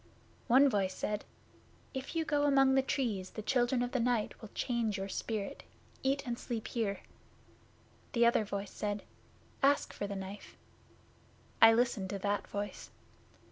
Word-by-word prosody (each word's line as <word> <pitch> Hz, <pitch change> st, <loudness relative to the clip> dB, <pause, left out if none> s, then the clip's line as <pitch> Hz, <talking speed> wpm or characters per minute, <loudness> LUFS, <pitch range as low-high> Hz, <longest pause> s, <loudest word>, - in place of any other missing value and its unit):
'One 265 Hz, +4 st, +7 dB
voice 195 Hz, -6 st, 0 dB
said, 210 Hz, 0 st, -2 dB, 0.7 s
"If 265 Hz, +4 st, -5 dB
you 325 Hz, -1 st, +1 dB
go 290 Hz, -2 st, +2 dB
among 270 Hz, -2 st, +5 dB
the 270 Hz, -, +5 dB
Trees, 225 Hz, -9 st, -1 dB
the 215 Hz, -, -7 dB
Children 245 Hz, +1 st, +2 dB
of 245 Hz, -, -3 dB
the 260 Hz, -, 0 dB
Night 235 Hz, -2 st, 0 dB
will 220 Hz, -, -9 dB
change 230 Hz, -4 st, 0 dB
your 195 Hz, +1 st, -4 dB
spirit. 210 Hz, 0 st, -3 dB, 0.4 s
Eat 275 Hz, +1 st, 0 dB
and 240 Hz, -1 st, -3 dB
sleep 230 Hz, -3 st, -4 dB
here." 205 Hz, -5 st, -1 dB, 1.1 s
The 235 Hz, -2 st, +4 dB
other 235 Hz, -2 st, +4 dB
voice 200 Hz, -1 st, -4 dB
said, 205 Hz, -1 st, -3 dB, 0.6 s
"Ask 280 Hz, +1 st, +3 dB
for 205 Hz, -, -4 dB
the 200 Hz, -, -4 dB
Knife." 195 Hz, +1 st, -8 dB, 1.0 s
I 225 Hz, 0 st, +10 dB
listened 230 Hz, -5 st, +1 dB
to 200 Hz, -, -2 dB
that 205 Hz, +1 st, -1 dB
voice. 205 Hz, 0 st, -5 dB
230 Hz, 155 wpm, -33 LUFS, 205-260 Hz, 1.1 s, I